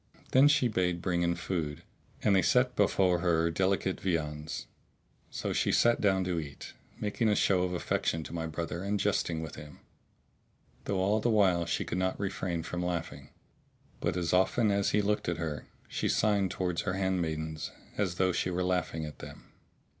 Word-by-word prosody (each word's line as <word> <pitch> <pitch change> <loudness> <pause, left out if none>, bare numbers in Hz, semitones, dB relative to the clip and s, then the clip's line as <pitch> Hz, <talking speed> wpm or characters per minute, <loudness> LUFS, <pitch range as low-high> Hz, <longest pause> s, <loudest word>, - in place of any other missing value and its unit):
Then 135 +3 +7
she 140 -4 +4
bade 90 -5 0
bring 85 -1 0
in 85 0 +1
food, 85 -4 -3 0.4
and 100 -2 +4
they 95 - +5
set 125 +3 +3
before 95 -3 +3
her 85 -1 +2
delicate 95 +2 0
viands; 75 -4 -2 0.6
so - - -3
she - - +1
sat 120 0 +3
down 95 -2 +3
to 90 -2 -1
eat, 70 -3 -8 0.3
making 105 +2 0
a 105 - +3
show 95 -3 +3
of 90 0 -1
affection 80 -1 -1
to - - -9
my 80 -1 -3
brother 85 +2 -4
and 100 +1 -1
jesting 85 -5 0
with 80 - -8
him, 75 -1 -10 1.1
though 100 - -1
all 100 +3 +2
the 120 - +1
while 95 -6 +3
she 85 - -1
could 90 - -2
not 95 0 -1
refrain 95 -4 -2
from 90 +1 -4
laughing; 85 -1 -4 0.7
but - - -1
as 85 -1 -1
often 100 +4 +3
as 100 0 +2
he 105 0 +2
looked 105 -3 0
at 85 - -1
her, 80 -3 -4 0.2
she - - -2
signed 100 -3 +2
towards 90 -2 -1
her 95 - -2
handmaidens 80 -5 -2 0.3
as 95 -4 -1
though 95 0 +2
she 90 - -1
were 90 0 -1
laughing 90 -3 -1
at 75 - -9
them. - - -11
90 Hz, 185 wpm, -30 LUFS, 85-100 Hz, 1.1 s, Then